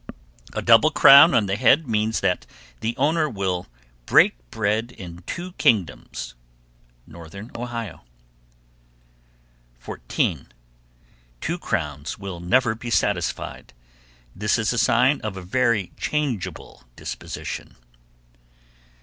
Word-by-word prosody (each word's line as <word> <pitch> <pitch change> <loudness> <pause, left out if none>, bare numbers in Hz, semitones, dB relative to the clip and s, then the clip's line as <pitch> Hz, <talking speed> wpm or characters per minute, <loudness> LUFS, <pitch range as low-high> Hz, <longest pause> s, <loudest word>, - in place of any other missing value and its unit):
A - - -3
double - - +6
crown 140 +5 +8
on 110 - +3
the 95 0 -1
head 140 +7 +4
means 110 0 0
that 90 - 0 0.3
the 115 +2 -3
owner 155 +3 +2
will 95 -6 -3 0.4
"break - - +5
bread 110 - -1
in 90 -6 -10
two 180 +2 -5
kingdoms." 90 - 0 0.7
Northern 85 +7 -11
Ohio. 115 -2 -6 1.8
14. - - -3 0.9
"Two 170 +3 -3
crowns 75 - -3
will 95 -3 -7
never 110 +7 +2
be 120 +2 -7
satisfied." 90 - -2 0.6
This 105 +4 +1
is 115 +1 0
a 125 - 0
sign 130 +6 +3
of 105 -3 -5
a 95 - -7
very 100 +1 0
changeable 140 - -3
disposition. - - -7
110 Hz, 105 wpm, -23 LUFS, 90-125 Hz, 1.8 s, crown